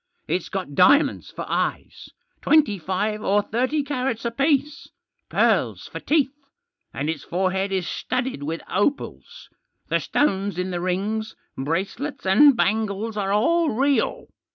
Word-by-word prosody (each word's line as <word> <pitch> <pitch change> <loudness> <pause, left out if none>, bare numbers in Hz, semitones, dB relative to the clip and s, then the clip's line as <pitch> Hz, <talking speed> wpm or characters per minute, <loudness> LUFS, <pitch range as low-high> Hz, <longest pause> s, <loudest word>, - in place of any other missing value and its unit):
It's - - -2
got - - -4
diamonds - - +4
for - - -7
eyes, - - -3 0.3
twenty 290 -11 +3
five 205 +5 -2
or 205 +1 +2
thirty 255 +8 0
carats 255 -4 -2
apiece; 280 +4 0 0.4
pearls - - +1
for - - -7
teeth, 285 -3 +1 0.6
and 145 - -3
its 160 -2 -3
forehead 190 +2 -1
is 185 -3 -1
studded 255 - -3
with 160 +3 -4
opals. 285 - -2 0.4
The - - +2
stones 200 - 0
in 180 +1 -2
the 175 -1 -3
rings, 205 +5 -2 0.2
bracelets, 190 - -3
and 240 +8 +6
bangles 215 0 0
are 195 -2 -1
all 325 +11 +2
real. 275 +4 0
215 Hz, 130 wpm, -23 LUFS, 190-275 Hz, 0.6 s, and